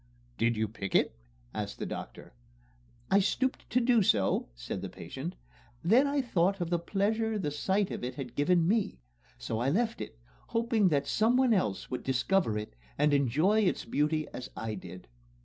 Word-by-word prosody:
"Did 115 -1 +2
you 110 0 +1
pick 100 -2 -5
it?" - - +3 0.4
asked - - -4
the - - -4
doctor. - - -7 0.8
"I 195 - +6
stooped 260 +6 0
to 250 - +3
do 240 -2 +4
so," 100 - +2
said - - -5
the - - -5
patient; 130 - -7 0.5
"then 235 +11 +5
I 280 -1 +1
thought 195 -4 +1
of 175 -1 -3
the 175 - +2
pleasure 215 +5 0
the 150 -8 -2
sight 190 +7 0
of - - -5
it 125 - -3
had 135 -4 -6
given 165 +3 +3
me 215 - +1 0.4
so - - -3
I 125 +3 +1
left 225 +8 0
it, 110 - -7 0.3
hoping 230 -3 +2
that 145 -4 +2
someone 245 +3 +3
else 105 - -1
would 125 - -2
discover 130 - +1
it 105 -11 -6 0.2
and 150 0 +3
enjoy 145 - +3
its 200 -4 +1
beauty 150 +1 0
as 125 - -6
I 110 0 -3
did." 90 -2 -9
170 Hz, 180 wpm, -30 LUFS, -, 0.8 s, I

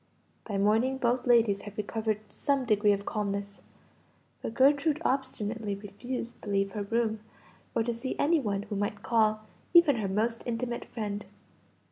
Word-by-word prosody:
By 205 -3 -2
morning 220 +6 +2
both 245 0 0
ladies 225 -5 +4
had 205 0 -10
recovered 215 0 -1
some 280 -2 0
degree 210 -2 +4
of 200 0 0
calmness, 200 -1 -3 0.8
but 225 - -5
Gertrude 285 +4 +4
obstinately 225 -5 -1
refused 230 +5 -6
to 210 - -7
leave 195 0 +1
her 210 - -4
room, 220 +1 0 0.6
or 225 - +3
to 235 +1 -1
see 235 +3 -4
any 320 +3 +3
one 205 -6 -1
who 210 - -5
might 205 +1 -2
call, 215 -2 +2 0.3
even 325 -7 +7
her 210 -3 -1
most 225 +4 0
intimate 240 0 -2
friend. 205 -3 -5
220 Hz, 155 wpm, -29 LUFS, 205-245 Hz, 0.8 s, even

